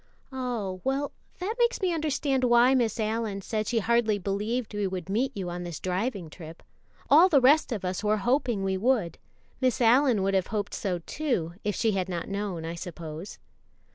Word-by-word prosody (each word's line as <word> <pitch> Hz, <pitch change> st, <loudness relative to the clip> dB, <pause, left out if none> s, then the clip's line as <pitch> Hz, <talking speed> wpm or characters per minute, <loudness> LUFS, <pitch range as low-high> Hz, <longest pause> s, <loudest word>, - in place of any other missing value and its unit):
"Oh, 235 Hz, -8 st, -3 dB
well, 275 Hz, +2 st, -1 dB, 0.3 s
that 380 Hz, +5 st, -2 dB
makes 475 Hz, 0 st, +2 dB
me 370 Hz, -3 st, 0 dB
understand 290 Hz, -4 st, 0 dB
why 240 Hz, +1 st, +5 dB
Miss 235 Hz, -4 st, +1 dB
Allyn 215 Hz, -2 st, -1 dB
said 215 Hz, +2 st, -2 dB
she 240 Hz, -, 0 dB
hardly 225 Hz, -1 st, +2 dB
believed 210 Hz, +5 st, -2 dB
we 205 Hz, -1 st, -1 dB
would 185 Hz, -1 st, -5 dB
meet 245 Hz, +7 st, 0 dB
you 180 Hz, -3 st, -3 dB
on 175 Hz, +1 st, -5 dB
this 175 Hz, -3 st, -6 dB
driving 185 Hz, 0 st, -2 dB
trip. 160 Hz, +1 st, -11 dB, 0.4 s
All 325 Hz, +7 st, +7 dB
the 295 Hz, -6 st, +5 dB
rest 280 Hz, +3 st, +4 dB
of 205 Hz, -5 st, -3 dB
us 185 Hz, +3 st, -2 dB
were 210 Hz, 0 st, +2 dB
hoping 240 Hz, -3 st, 0 dB
we 190 Hz, 0 st, 0 dB
would. 220 Hz, -5 st, 0 dB, 0.4 s
Miss 255 Hz, -1 st, +2 dB
Allyn 245 Hz, -2 st, +4 dB
would 195 Hz, 0 st, +1 dB
have 190 Hz, -1 st, +1 dB
hoped 210 Hz, -2 st, -3 dB
so, 180 Hz, -4 st, -2 dB
too, 240 Hz, -, -2 dB
if 210 Hz, -2 st, -1 dB
she 225 Hz, -, +1 dB
had 190 Hz, -2 st, -1 dB
not 170 Hz, -2 st, -3 dB
known, 195 Hz, -5 st, -3 dB
I 165 Hz, -, -4 dB
suppose." 170 Hz, +1 st, -7 dB
215 Hz, 190 wpm, -27 LUFS, 185-255 Hz, 0.4 s, All